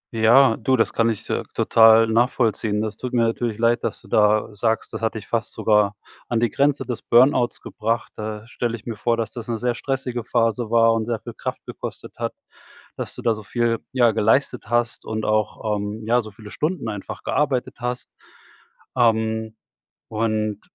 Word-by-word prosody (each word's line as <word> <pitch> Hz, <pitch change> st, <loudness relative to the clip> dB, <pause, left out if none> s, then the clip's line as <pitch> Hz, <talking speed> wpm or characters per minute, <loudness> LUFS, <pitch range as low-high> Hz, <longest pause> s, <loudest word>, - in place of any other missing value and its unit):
Ja, 115 Hz, +2 st, +5 dB
du, 130 Hz, +4 st, +1 dB
das 115 Hz, -, +1 dB
kann 115 Hz, 0 st, +2 dB
ich, 110 Hz, -, -4 dB
äh, -, -, 0 dB
total 115 Hz, 0 st, +6 dB
nachvollziehen. 110 Hz, -2 st, +1 dB
Das 110 Hz, -1 st, -4 dB
tut 125 Hz, 0 st, -6 dB
mir 120 Hz, -1 st, +3 dB
natürlich 115 Hz, -1 st, -1 dB
leid, 120 Hz, +1 st, +2 dB
dass -, -, -3 dB
du -, -, -18 dB
da 105 Hz, 0 st, +2 dB
sagst, 110 Hz, +2 st, -1 dB
das -, -, -5 dB
hat 115 Hz, 0 st, -1 dB
dich 110 Hz, -, -6 dB
„fast 115 Hz, -1 st, -2 dB
sogar 105 Hz, -1 st, +2 dB, 0.3 s
an 120 Hz, -, 0 dB
die 120 Hz, -2 st, +1 dB
Grenze 140 Hz, -1 st, +1 dB
des 125 Hz, -, -4 dB
Burnouts 125 Hz, 0 st, +3 dB
gebracht“. 115 Hz, +2 st, -3 dB
Da 105 Hz, 0 st, -6 dB
stelle 120 Hz, -1 st, -3 dB
ich 110 Hz, -, -12 dB
mir 115 Hz, -2 st, -4 dB
vor, 115 Hz, +2 st, 0 dB
dass 110 Hz, -2 st, -2 dB
das 115 Hz, -1 st, -8 dB
'ne 115 Hz, -, -1 dB
sehr 120 Hz, +1 st, 0 dB
stressige 125 Hz, -1 st, -3 dB
Phase 115 Hz, -1 st, 0 dB
war 115 Hz, -1 st, +5 dB
und 115 Hz, 0 st, -1 dB
sehr 115 Hz, -2 st, -1 dB
viel 115 Hz, +1 st, -9 dB
Kraft -, -, -5 dB
gekostet -, -, -8 dB
hat, -, -, -3 dB, 0.6 s
dass -, -, -6 dB
du -, -, -9 dB
da 115 Hz, -, +3 dB
so 110 Hz, -, -8 dB
viel, 115 Hz, +2 st, 0 dB
ja, 120 Hz, -3 st, +4 dB
geleistet 115 Hz, +4 st, +1 dB
hast 120 Hz, 0 st, 0 dB
und 110 Hz, 0 st, -4 dB
auch, 110 Hz, 0 st, 0 dB
ähm, 105 Hz, +2 st, -5 dB
ja, 120 Hz, +2 st, +3 dB
so 110 Hz, -, -9 dB
viele 105 Hz, 0 st, -13 dB
Stunden 155 Hz, -7 st, -2 dB
einfach 105 Hz, -2 st, -7 dB
gearbeitet 135 Hz, -4 st, -1 dB
hast. 125 Hz, +1 st, -4 dB, 0.9 s
Ähm. 110 Hz, -1 st, +1 dB, 0.5 s
Und, 110 Hz, -1 st, -1 dB
115 Hz, 190 wpm, -22 LUFS, 110-120 Hz, 0.9 s, total